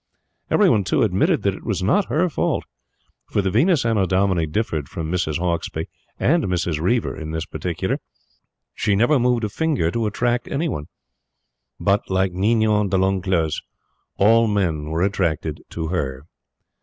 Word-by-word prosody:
Every 210 Hz, -, +4 dB
one, 110 Hz, -, +3 dB
too, 120 Hz, +7 st, +1 dB
admitted 95 Hz, -3 st, +2 dB
that -, -, +2 dB
it -, -, -10 dB
was -, -, -2 dB
not 190 Hz, -, +3 dB
her 165 Hz, +5 st, +1 dB
fault; 165 Hz, -, -1 dB, 0.7 s
for 100 Hz, -, 0 dB
the 95 Hz, -, 0 dB
Venus 140 Hz, -, +3 dB
Annodomini 95 Hz, -5 st, +2 dB
differed 75 Hz, -6 st, -2 dB
from 80 Hz, -1 st, -4 dB
Mrs. 85 Hz, -4 st, 0 dB
Hauksbee 85 Hz, -2 st, -2 dB, 0.3 s
and 165 Hz, +2 st, +2 dB
Mrs. 85 Hz, -4 st, -1 dB
Reiver 115 Hz, +7 st, 0 dB
in 80 Hz, -1 st, -6 dB
this 80 Hz, 0 st, -3 dB
particular -, -, -3 dB, 0.7 s
she 105 Hz, -2 st, +1 dB
never 120 Hz, +7 st, +3 dB
moved 120 Hz, -1 st, +2 dB
a 105 Hz, -, 0 dB
finger 140 Hz, -, 0 dB
to 115 Hz, +2 st, -1 dB
attract 120 Hz, +3 st, 0 dB
any 160 Hz, +4 st, -1 dB
one; 75 Hz, -, -4 dB, 0.9 s
but, 100 Hz, 0 st, +1 dB
like 95 Hz, 0 st, +1 dB
Ninon 105 Hz, +2 st, +2 dB
de 95 Hz, -, +1 dB
l'Enclos, 95 Hz, -4 st, 0 dB, 0.6 s
all 115 Hz, +3 st, +5 dB
men 90 Hz, -8 st, 0 dB
were 80 Hz, +2 st, 0 dB
attracted 95 Hz, -5 st, -1 dB
to 80 Hz, -1 st, -4 dB
her. 70 Hz, -6 st, -3 dB
95 Hz, 155 wpm, -22 LUFS, 85-115 Hz, 0.9 s, all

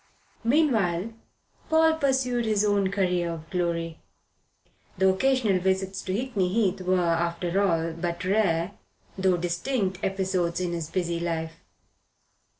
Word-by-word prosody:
Meanwhile 225 Hz, -, +2 dB, 0.6 s
Paul 320 Hz, 0 st, +4 dB
pursued 260 Hz, -4 st, +1 dB
his 210 Hz, -1 st, +2 dB
own 200 Hz, -2 st, +2 dB
career 180 Hz, -3 st, 0 dB
of 165 Hz, -1 st, -6 dB
glory. 170 Hz, -2 st, -2 dB, 1.0 s
The 190 Hz, +1 st, +3 dB
occasional 220 Hz, -1 st, +2 dB
visits 190 Hz, +1 st, -1 dB
to 185 Hz, -, -4 dB
Hickney 205 Hz, -4 st, -1 dB
Heath 195 Hz, -3 st, +1 dB
were, 185 Hz, 0 st, +1 dB
after 170 Hz, +2 st, 0 dB
all, 165 Hz, -4 st, +1 dB
but 170 Hz, +1 st, -4 dB
rare, 185 Hz, -3 st, +1 dB, 0.4 s
though 190 Hz, -2 st, +2 dB
distinct, 185 Hz, +3 st, -2 dB
episodes 185 Hz, -3 st, 0 dB
in 180 Hz, -1 st, -1 dB
his 165 Hz, -2 st, -4 dB
busy 170 Hz, -2 st, -1 dB
life. 165 Hz, -1 st, -2 dB
185 Hz, 125 wpm, -26 LUFS, 170-210 Hz, 1.0 s, Paul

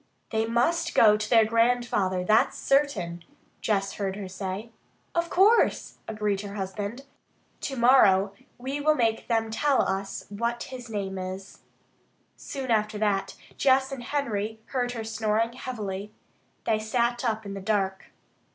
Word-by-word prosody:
"They 220 Hz, 0 st, 0 dB
must 330 Hz, +9 st, +1 dB
go 210 Hz, -2 st, +7 dB
to 210 Hz, 0 st, -3 dB
their 225 Hz, -2 st, +6 dB
grandfather, 230 Hz, -5 st, +1 dB
that's 215 Hz, +4 st, +3 dB
certain," 200 Hz, -, +1 dB, 0.4 s
Jess 195 Hz, -2 st, 0 dB
heard 195 Hz, -2 st, -3 dB
her 200 Hz, -2 st, -6 dB
say. 190 Hz, +4 st, -5 dB, 0.4 s
"Of 340 Hz, 0 st, 0 dB
course," 415 Hz, +6 st, +3 dB
agreed 210 Hz, -2 st, -1 dB
her 200 Hz, -1 st, -7 dB
husband. 205 Hz, +5 st, -4 dB, 0.6 s
"Tomorrow 235 Hz, -7 st, +4 dB, 0.2 s
we 270 Hz, +4 st, -4 dB
will 305 Hz, +1 st, +4 dB
make 225 Hz, -4 st, 0 dB
them 225 Hz, -2 st, 0 dB
tell 270 Hz, +5 st, +2 dB
us 195 Hz, +1 st, -3 dB
what 235 Hz, +3 st, -2 dB
his 250 Hz, -2 st, -9 dB
name 195 Hz, -3 st, -3 dB
is." 185 Hz, +1 st, -7 dB, 0.8 s
Soon 265 Hz, -3 st, -5 dB
after 215 Hz, -1 st, +1 dB
that 195 Hz, -2 st, 0 dB, 0.2 s
Jess 265 Hz, 0 st, +3 dB
and 270 Hz, -2 st, -5 dB
Henry 220 Hz, -5 st, -2 dB
heard 245 Hz, -2 st, -2 dB
her 225 Hz, -2 st, -4 dB
snoring 220 Hz, +1 st, 0 dB
heavily. 210 Hz, -6 st, -5 dB, 0.5 s
They 220 Hz, -1 st, +1 dB
sat 235 Hz, +2 st, 0 dB
up 220 Hz, -3 st, -1 dB
in 200 Hz, -, -5 dB
the 195 Hz, -, -6 dB
dark. 195 Hz, -2 st, -1 dB
220 Hz, 140 wpm, -27 LUFS, 200-245 Hz, 0.8 s, go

